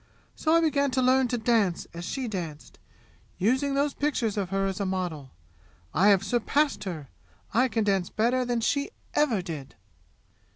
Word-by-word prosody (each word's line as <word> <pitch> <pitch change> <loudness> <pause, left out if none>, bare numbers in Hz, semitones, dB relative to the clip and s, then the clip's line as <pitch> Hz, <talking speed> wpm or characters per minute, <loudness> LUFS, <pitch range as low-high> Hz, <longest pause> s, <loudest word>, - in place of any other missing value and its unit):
So 315 +1 +2
I 335 - +5
began 285 -3 +2
to - - +4
learn 260 0 +4
to 245 - -1
dance 220 -6 +1
as 170 +1 -6
she 260 +4 -3
danced, 170 -8 -6 0.6
using 260 +7 +1
those 280 +1 +1
pictures 260 -7 -1
of 200 -3 -2
her 195 0 0
as 195 0 -2
a 200 - -1
model. 175 -7 -3 0.6
I 185 +6 +4
have 200 -2 +5
surpassed 245 +1 +1
her! 160 -7 -6 0.4
I 250 +4 +4
can 225 -3 0
dance 195 -3 +1
better 245 +4 +1
than 240 -1 -1
she 280 - 0 0.2
ever 240 -11 +2
did! 155 -7 -7
220 Hz, 170 wpm, -27 LUFS, 185-260 Hz, 0.6 s, I